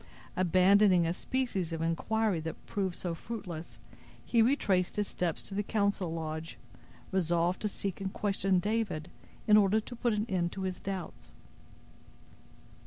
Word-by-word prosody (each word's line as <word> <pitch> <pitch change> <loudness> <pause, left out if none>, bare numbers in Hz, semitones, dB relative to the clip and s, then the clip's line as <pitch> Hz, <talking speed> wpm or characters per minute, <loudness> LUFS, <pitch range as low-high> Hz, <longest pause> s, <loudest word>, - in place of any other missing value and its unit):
Abandoning 185 +1 +5
a 165 - +1
species 195 -5 -2
of 165 - -3
inquiry 190 +4 0
that 160 +1 -6
proved 190 -3 -2
so 175 -2 -3
fruitless, 175 -4 -7 0.5
he 230 - +3
retraced 205 -7 +2
his 205 -1 0
steps 175 -3 -2
to - - -8
the 200 - 0
council 200 -4 0
lodge, 160 0 -4 0.5
resolved 175 -1 +1
to 215 - +1
seek 195 -1 -4
and 190 -1 -2
question 195 -2 +1
David, 190 -5 -1 0.3
in 210 -1 +7
order 210 +1 +4
to 245 +3 -8
put 235 -1 +1
an 210 +1 0
end 175 -4 0
to 190 - -4
his 185 -1 -3
doubts. 180 - -6
190 Hz, 150 wpm, -31 LUFS, 170-210 Hz, 0.5 s, in